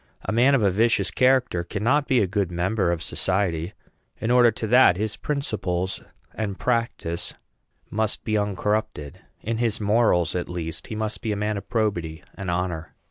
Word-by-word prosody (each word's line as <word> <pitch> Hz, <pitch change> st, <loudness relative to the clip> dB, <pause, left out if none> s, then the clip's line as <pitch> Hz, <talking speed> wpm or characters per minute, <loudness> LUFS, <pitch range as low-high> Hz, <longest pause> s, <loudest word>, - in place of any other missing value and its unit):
A -, -, -1 dB
man 125 Hz, +5 st, +4 dB
of 125 Hz, -, +2 dB
a 100 Hz, -, +4 dB
vicious 100 Hz, -2 st, +2 dB
character 125 Hz, -8 st, +2 dB
cannot 120 Hz, +11 st, 0 dB
be 130 Hz, -3 st, +3 dB
a -, -, +3 dB
good 95 Hz, -1 st, -1 dB
member 90 Hz, +2 st, 0 dB
of 85 Hz, -2 st, -2 dB
society. 90 Hz, -2 st, -1 dB, 0.5 s
In 115 Hz, -, -1 dB
order 125 Hz, -1 st, +6 dB
to 115 Hz, -, -4 dB
that, 115 Hz, -5 st, +6 dB
his 110 Hz, +1 st, -1 dB
principles 95 Hz, -11 st, -2 dB, 0.3 s
and 100 Hz, -3 st, -3 dB
practice 115 Hz, -8 st, -2 dB, 0.6 s
must 110 Hz, 0 st, -1 dB
be 110 Hz, -, -1 dB
uncorrupted; 105 Hz, -6 st, -1 dB, 0.2 s
in 115 Hz, +1 st, -2 dB
his 115 Hz, -3 st, 0 dB
morals, 105 Hz, -5 st, +2 dB
at 90 Hz, -, -2 dB
least, 85 Hz, -2 st, -5 dB
he 110 Hz, -, -5 dB
must 110 Hz, 0 st, -3 dB
be 110 Hz, -, -2 dB
a -, -, 0 dB
man 105 Hz, +1 st, -1 dB
of 100 Hz, -, -7 dB
probity 90 Hz, -8 st, -1 dB
and 95 Hz, -2 st, -6 dB
honor. 85 Hz, -2 st, -3 dB
105 Hz, 175 wpm, -24 LUFS, 90-115 Hz, 0.6 s, order